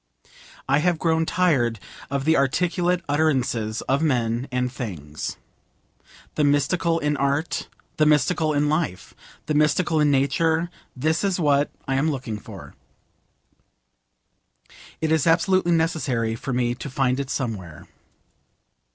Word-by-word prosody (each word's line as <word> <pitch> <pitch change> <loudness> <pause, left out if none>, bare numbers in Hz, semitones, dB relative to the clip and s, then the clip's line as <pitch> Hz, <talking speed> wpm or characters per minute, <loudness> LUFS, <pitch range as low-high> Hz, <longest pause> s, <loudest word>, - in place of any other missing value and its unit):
I 140 +2 +3
have 175 +2 +1
grown 160 0 +1
tired 130 - +1 0.3
of 140 -1 -2
the 160 +1 +4
articulate 175 +6 +1
utterances 130 -7 0
of 135 +2 0
men 125 -4 0
and 125 0 -1
things. 80 - -6 1.0
The 150 - 0
Mystical 165 +4 +2
in 150 -2 0
Art, 140 +4 -1 0.3
the 155 - +4
Mystical 155 +2 +2
in 145 0 +1
Life, 150 - -2 0.3
the 155 - -1
Mystical 155 +2 +2
in 150 -1 +4
Nature 160 +5 +1 0.2
this 155 +7 0
is 195 -2 0
what 145 -2 +2 0.2
I 135 - 0
am 150 +4 +2
looking 125 -7 -4
for. - - -11 2.3
It 160 0 0
is 160 -1 +2
absolutely 175 +1 +3
necessary 155 -9 0
for 135 - -5
me 120 -1 +1
to 130 +3 -7
find 130 0 0
it 140 -1 -4
somewhere. 100 - -4
145 Hz, 130 wpm, -23 LUFS, 125-160 Hz, 2.3 s, the